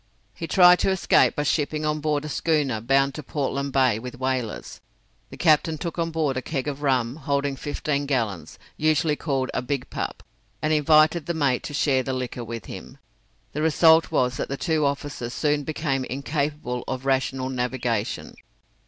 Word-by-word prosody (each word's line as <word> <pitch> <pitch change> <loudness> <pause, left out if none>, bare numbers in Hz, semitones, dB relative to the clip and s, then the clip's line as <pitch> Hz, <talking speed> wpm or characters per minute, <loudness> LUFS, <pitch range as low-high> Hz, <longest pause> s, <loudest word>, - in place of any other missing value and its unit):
He 165 - -6
tried 180 +1 +6
to - - +2
escape 190 -2 +3
by 145 - 0
shipping 150 +1 0
on 150 0 0
board 150 -1 -1
a - - -4
schooner 145 -7 0
bound 135 +3 +2
to 155 - -6
Portland 140 -1 -2
Bay 130 -5 +3
with 125 +1 -8
whalers. 130 -4 -3 0.5
The - - -11
captain 160 -1 +3
took 170 +2 -5
on 165 0 0
board 155 -4 -1
a - - -1
keg 135 +1 -3
of 145 -1 -4
rum, 130 -2 +1
holding 140 -1 -1
fifteen 145 +1 -2
gallons, 105 - -2 0.2
usually 155 0 +2
called 135 -4 -2
a - - -1
"Big 125 0 -3
Pup," - - -4 0.4
and 155 0 0
invited 155 +1 +4
the 170 - -1
mate 140 -5 +1
to 145 - -5
share 135 -3 +2
the 130 +1 -3
liquor 125 -1 -4
with 115 -1 -7
him. 95 +8 -9 0.6
The 150 - -2
result 160 +1 +5
was 125 0 +1
that - - -3
the 135 - -3
two 155 -2 +1
officers 140 -4 -4
soon 150 -1 +1
became 145 -3 -2
incapable 140 -2 -3
of 130 0 -4
rational 130 -1 0
navigation. 125 -3 -2
140 Hz, 180 wpm, -24 LUFS, 130-155 Hz, 0.6 s, tried